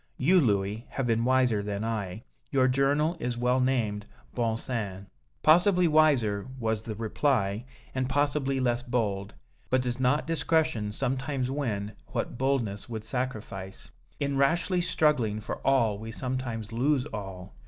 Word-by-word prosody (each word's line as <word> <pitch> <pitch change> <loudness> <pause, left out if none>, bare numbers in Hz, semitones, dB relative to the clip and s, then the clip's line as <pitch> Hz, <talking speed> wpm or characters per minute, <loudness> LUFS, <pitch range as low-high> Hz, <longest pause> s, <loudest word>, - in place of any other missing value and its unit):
You, 180 +8 +5
Louis, 105 -2 0
have 135 - -2
been 115 0 +1
wiser 125 -4 +3
than 100 0 -3
I. 110 -2 -3 0.3
Your 130 -2 +3
journal 140 +5 +2
is 120 -3 -2
well 125 +1 +2
named 115 -6 0 0.3
'Bon 115 -2 0
Sens.'" 100 -6 -4 0.4
"Possibly 180 +3 +5
wiser," 135 -10 +3
was 110 -2 0
the 110 -1 -6
reply, 110 -1 0 0.3
"and 130 0 -1
possibly 140 -1 +1
less 120 -2 +1
bold. 105 -5 -2 0.3
But 130 0 +2
does 125 0 -2
not 130 +4 +2
discretion 160 -9 +1
sometimes 130 +2 -2
win 110 -8 -2 0.2
what - - -3
boldness 120 -7 -1
would 110 -2 -5
sacrifice? 110 - -5 0.3
In 140 -1 0
rashly 170 +6 +2
struggling 140 -11 +2
for 110 - -5
all 115 -7 +2
we 110 +1 -6
sometimes 120 -3 -4
lose 130 +3 +1
all. 95 -3 -7
125 Hz, 145 wpm, -28 LUFS, 105-135 Hz, 0.4 s, You